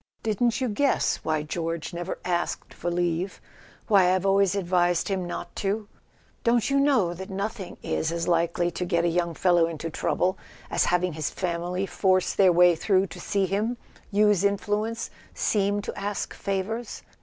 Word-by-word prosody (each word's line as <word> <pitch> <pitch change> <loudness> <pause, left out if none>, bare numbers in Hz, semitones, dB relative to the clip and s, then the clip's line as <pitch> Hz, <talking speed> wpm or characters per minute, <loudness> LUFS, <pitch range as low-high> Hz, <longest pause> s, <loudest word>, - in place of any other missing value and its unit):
Didn't 225 +3 +1
you 260 - 0
guess 260 +6 +1
why 155 -1 -1
George 165 +2 -3
never 175 +2 -4
asked 175 -1 -2
for 175 - -3
leave—why 180 +2 0
I've 185 +1 -1
always 195 -1 +3
advised 175 -2 +1
him 185 -2 -1
not - - -6
to? 205 +1 -1 0.6
Don't 235 +2 +2
you 275 - +3
know 260 -12 +3
that 190 +2 -8
nothing 195 0 -4
is 160 - -1
as 170 0 -2
likely 170 0 +1
to 180 - -3
get 170 -1 +1
a - - +3
young 170 -1 0
fellow 175 -2 +3
into 165 0 -5
trouble 185 +4 0 0.3
as - - +2
having 180 0 +1
his 155 -2 -2
family 180 +1 -2
force 185 -1 +1
their 190 -2 +5
way 175 0 +6
through 190 +2 +2
to 180 - -10
see 195 +2 0
him, 210 +6 -1 0.3
use 210 -2 +3
influence, 210 +3 -1 0.2
seem 205 -1 +1
to - - -5
ask 205 0 -3
favours 205 +4 -3
185 Hz, 165 wpm, -26 LUFS, 175-205 Hz, 0.6 s, way